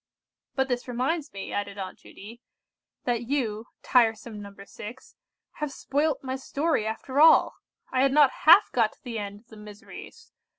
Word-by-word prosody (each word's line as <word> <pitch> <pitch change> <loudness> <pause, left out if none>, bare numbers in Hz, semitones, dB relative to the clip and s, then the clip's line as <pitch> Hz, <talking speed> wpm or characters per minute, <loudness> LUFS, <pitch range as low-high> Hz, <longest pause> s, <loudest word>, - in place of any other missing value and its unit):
"But 265 -1 +1
this 245 -1 -3
reminds 270 +6 -2
me," 195 -1 -7
added 205 0 -3
Aunt 190 -2 -7
Judy, 230 +4 -13 0.6
"that 235 -1 -1
you—tiresome 225 -3 0
No. 200 - -8
6—have 230 +8 -10
spoilt 285 +1 -1
my 260 0 -3
story 275 -2 -1
after 260 +5 -3
all! 320 - +6 0.4
I 255 - +1
had 275 0 +3
not 290 -1 +5 0.2
half 340 +6 +8
got 225 -3 +1
to - - -31
the 235 -3 -5
end 205 0 -7
of 230 - -35
the 220 - -13
miseries. 210 - -12
245 Hz, 155 wpm, -26 LUFS, 210-275 Hz, 0.6 s, half